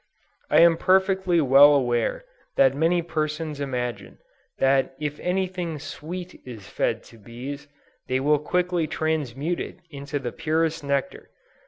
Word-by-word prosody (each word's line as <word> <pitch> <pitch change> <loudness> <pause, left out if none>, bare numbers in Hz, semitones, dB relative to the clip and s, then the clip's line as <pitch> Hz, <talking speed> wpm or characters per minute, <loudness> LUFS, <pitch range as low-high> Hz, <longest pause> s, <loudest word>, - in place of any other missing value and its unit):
I - - +5
am 170 -1 +6
perfectly 190 -2 +2
well 145 +1 +7
aware 120 - 0 0.3
that 135 -1 +5
many 165 +4 +1
persons 155 -2 -3
imagine 125 -7 -4 0.4
that 135 0 +2
if 150 -1 -4
any 190 +1 0
thing 180 -3 -5
sweet 175 +5 -8
is 110 -6 -10
fed - - -1
to 115 - -17
bees, 130 +7 -8 0.4
they 130 0 0
will 145 +2 +2
quickly 175 +1 0
transmute 155 0 -2
it - - -6
into 140 0 -5
the 125 -4 -4
purest 160 0 -1
nectar. 140 - -2
150 Hz, 140 wpm, -24 LUFS, 135-170 Hz, 0.4 s, well